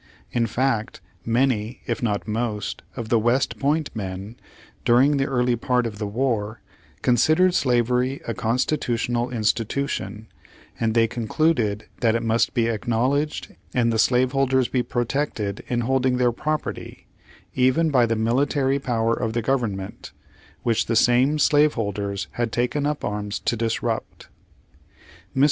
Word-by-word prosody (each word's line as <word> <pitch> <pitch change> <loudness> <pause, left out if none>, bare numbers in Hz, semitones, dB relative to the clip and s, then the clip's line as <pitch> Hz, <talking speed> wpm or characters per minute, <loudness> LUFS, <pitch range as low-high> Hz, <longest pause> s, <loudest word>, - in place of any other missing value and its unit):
In 115 -1 +1
fact 115 -2 -1 0.3
many, 115 -1 0
if 120 -2 -2
not 105 -3 -1
most 105 -3 -2
of 115 -3 -5
the 115 - +4
West 120 +4 +1
Point 150 +1 0
men, 100 +1 -5 0.5
during 135 +5 +4
the 135 0 +1
early 125 -2 +1
part 125 +1 0
of 105 -3 -5
the 105 - -2
war, 110 -1 -1 0.4
considered 155 +9 +4
slavery 125 -1 +1
a 115 - -1
constitutional 120 0 0
institution, 110 -2 -2 0.5
and 115 0 0
they 115 -1 +4
con 115 -1 -5
cluded 115 -11 +1 0.2
that 115 -2 +2
it 115 - -1
must 115 +3 +1
be 115 -2 +2
acknowledged 120 +6 -1 0.2
and 115 -2 +2
the 110 - 0
slave 125 +2 +3
holders 130 -2 +2
be 125 - 0
protected 120 -4 -2
in 120 -1 0
holding 130 +1 +1
their 125 -1 +3
property, 155 +6 -4 0.5
even 130 +6 +2
by 125 -4 +4
the 115 - 0
military 135 +4 +1
power 115 -4 0
of 115 -1 -2
the 115 0 -1
government, 110 -7 -2 0.5
which 115 -1 +1
the 115 - 0
same 125 +6 +4
slaveholders 105 -10 +1
had 120 -2 -2
taken 130 +5 0
up 150 0 -2
arms 105 0 -3
to - - -1
disrupt. 115 0 -3 1.1
Mr. - - 0
120 Hz, 145 wpm, -23 LUFS, 110-130 Hz, 1.1 s, the